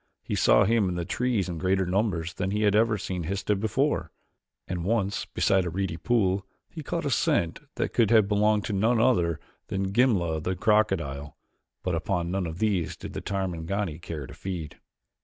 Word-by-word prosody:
He -, -, -4 dB
saw -, -, +5 dB
him 110 Hz, -2 st, +2 dB
in 90 Hz, -, -3 dB
the 85 Hz, -1 st, -2 dB
trees 115 Hz, -1 st, 0 dB
in 85 Hz, -3 st, -4 dB
greater 95 Hz, +1 st, +1 dB
numbers 90 Hz, -3 st, 0 dB
than 95 Hz, 0 st, -2 dB
he 105 Hz, +2 st, +1 dB
ever 105 Hz, +2 st, +3 dB
had 100 Hz, -, -6 dB
seen 90 Hz, -2 st, -3 dB
Histah 100 Hz, +3 st, 0 dB
before; 110 Hz, -, 0 dB, 0.6 s
and 90 Hz, -2 st, -3 dB
once 100 Hz, 0 st, 0 dB
beside 95 Hz, -1 st, +2 dB
a 90 Hz, -, -2 dB
reedy 95 Hz, 0 st, -2 dB
pool 100 Hz, -1 st, +1 dB, 0.2 s
he -, -, -8 dB
caught -, -, -3 dB
a -, -, 0 dB
scent 85 Hz, -1 st, +1 dB, 0.2 s
that -, -, -2 dB
could 115 Hz, -4 st, +3 dB
have 110 Hz, -3 st, +5 dB
belonged 105 Hz, 0 st, +2 dB
to 105 Hz, -, -3 dB
none 110 Hz, +4 st, +2 dB
other 90 Hz, -10 st, +2 dB, 0.3 s
than 95 Hz, 0 st, -2 dB
Gimla 95 Hz, -10 st, +2 dB
the 95 Hz, +4 st, -2 dB
crocodile, 85 Hz, -9 st, 0 dB, 0.5 s
but 90 Hz, -, -1 dB
upon 85 Hz, +1 st, -1 dB
none 95 Hz, -2 st, -1 dB
of 80 Hz, 0 st, -6 dB
these 100 Hz, -5 st, 0 dB
did -, -, -8 dB
the -, -, -4 dB
Tarmangani 95 Hz, -2 st, -2 dB
care 80 Hz, -4 st, -6 dB
to -, -, -11 dB
feed. 90 Hz, -6 st, -6 dB
95 Hz, 190 wpm, -27 LUFS, 85-105 Hz, 0.6 s, saw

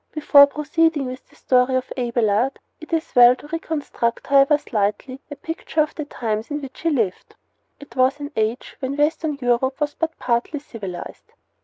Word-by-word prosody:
Before 290 Hz, -2 st, +7 dB
proceeding 300 Hz, +1 st, 0 dB
with 255 Hz, 0 st, -8 dB
the -, -, -23 dB
story 255 Hz, 0 st, +2 dB
of 255 Hz, 0 st, -2 dB
Abelard 240 Hz, 0 st, 0 dB, 0.2 s
it 315 Hz, -, -12 dB
is 325 Hz, -1 st, -2 dB
well 245 Hz, 0 st, +7 dB
to 275 Hz, -, -14 dB
reconstruct, 300 Hz, -7 st, -3 dB
however 280 Hz, +1 st, +5 dB
slightly, 225 Hz, +1 st, -2 dB
a 290 Hz, -, -6 dB
picture 325 Hz, +2 st, -5 dB
of 300 Hz, -, -7 dB
the 300 Hz, -, -5 dB
times 220 Hz, -5 st, -3 dB
in 295 Hz, 0 st, -3 dB
which 270 Hz, -2 st, -10 dB
he 330 Hz, -, +1 dB
lived. 225 Hz, -, -2 dB, 0.4 s
It 285 Hz, -5 st, -14 dB
was 260 Hz, +2 st, +2 dB
an 290 Hz, 0 st, -6 dB
age 220 Hz, +3 st, -2 dB
when 270 Hz, +1 st, -3 dB
Western 300 Hz, 0 st, 0 dB
Europe 250 Hz, +1 st, 0 dB
was 295 Hz, -1 st, -1 dB
but 325 Hz, -1 st, -3 dB
partly 240 Hz, +5 st, -1 dB
civilized. 200 Hz, -10 st, -9 dB
270 Hz, 175 wpm, -22 LUFS, 240-295 Hz, 0.4 s, Before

